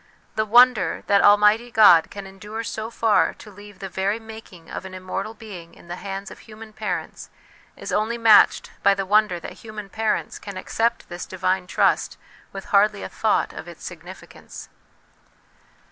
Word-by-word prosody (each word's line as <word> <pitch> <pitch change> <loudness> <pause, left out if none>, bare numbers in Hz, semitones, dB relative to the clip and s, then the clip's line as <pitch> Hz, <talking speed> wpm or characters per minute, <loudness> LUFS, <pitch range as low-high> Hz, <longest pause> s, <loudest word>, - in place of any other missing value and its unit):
The 215 - -1
wonder 245 +1 +4
that 200 0 +3
Almighty 210 +3 +4
God 210 -8 +6
can 200 -1 -9
endure 210 +4 -8
so 220 0 -5
far 225 -2 +1
to 210 - -14
leave 205 0 -14
the 195 0 -7
very 195 +4 -2
making 220 -7 -13
of - - -7
an 190 -1 -9
immortal 185 +4 -5
b^ing 185 -7 -11
in 175 - -18
the 175 - -5
hands 195 0 -7
of - - -12
human 215 0 -13
parents - - -5 0.5
is - - -7
only 220 +3 0
matched 225 -2 +5
by 200 0 +4
the 195 0 -3
wonder 210 -2 +2
that - - -9
human 215 -2 -9
parents 220 +2 -2
can 200 -2 -8
accept 230 +5 -1
this 175 0 -7
divine 185 0 -1
trust - - +1 0.3
with 195 -1 -8
hardly 205 0 +3
a - - -6
thought - - 0
of - - -9
its - - -11
significance. - - -11
205 Hz, 170 wpm, -22 LUFS, 190-220 Hz, 0.5 s, God